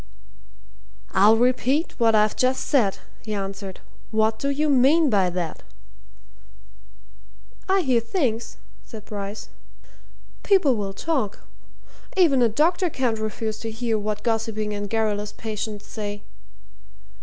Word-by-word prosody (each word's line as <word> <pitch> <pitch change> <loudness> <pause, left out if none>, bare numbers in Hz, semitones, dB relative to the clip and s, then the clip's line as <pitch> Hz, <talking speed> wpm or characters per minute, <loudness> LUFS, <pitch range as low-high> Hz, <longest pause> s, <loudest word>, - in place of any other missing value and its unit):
"I'll 210 +4 +5
repeat 255 +5 +1
what 225 -2 +4
I've 210 0 +3
just 255 +1 +1
said," 225 -9 +2 0.3
he 215 -1 -4
answered. 195 -1 -5 0.3
"What 220 0 +1
do 280 - -1
you 295 +2 0
mean 285 +2 +4
by 195 -3 +3
that?" 175 -2 -4 2.1
"I 385 0 +4
hear 260 -7 +2
things," 230 - -2 0.3
said 220 -3 -11
Bryce. 205 0 -6 0.9
"People 370 -11 +3
will 200 -2 -3
talk 260 -5 -2 0.7
even 305 -9 +5
a 235 - +5
doctor 335 - +2
can't 245 -6 -1
refuse 220 0 -3
to 225 - -5
hear 225 0 -1
what 210 0 -3
gossiping 225 -2 -1
and 205 0 -4
garrulous 210 -2 -1
patients 215 -1 -5
say. 205 -1 -6
225 Hz, 120 wpm, -24 LUFS, 210-260 Hz, 2.1 s, I'll